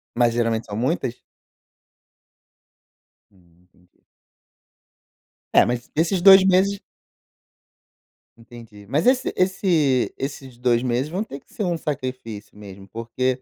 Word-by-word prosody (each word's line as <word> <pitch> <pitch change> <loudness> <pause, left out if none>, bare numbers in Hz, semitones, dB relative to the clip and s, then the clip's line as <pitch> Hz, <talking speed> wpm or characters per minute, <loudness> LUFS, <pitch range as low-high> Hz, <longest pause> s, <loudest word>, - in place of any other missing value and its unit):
Mas 120 -1 +2
geralmente 115 -1 0
são 100 - -6
muitas? 130 -1 -2 2.1
Hum, 85 -3 -27
entendi. 90 0 -31 1.5
É, - - +6
mas 120 0 -3
esses 170 +3 +1
2 190 0 +9
meses 195 +1 +2 1.6
Entendi. 115 -3 -14
Mas 140 +8 0
esse 255 0 +2
esse 170 -8 +1
esses 135 -2 -7
2 120 -1 +1
meses 125 +3 -1
vão 185 +6 -2
ter 140 -10 -9
que - - -30
ser 215 - -3
um 175 -3 -1
sacrifício 130 -9 -6
mesmo, 100 -1 -12
porque 125 +4 -3
125 Hz, 115 wpm, -22 LUFS, 115-165 Hz, 2.1 s, 2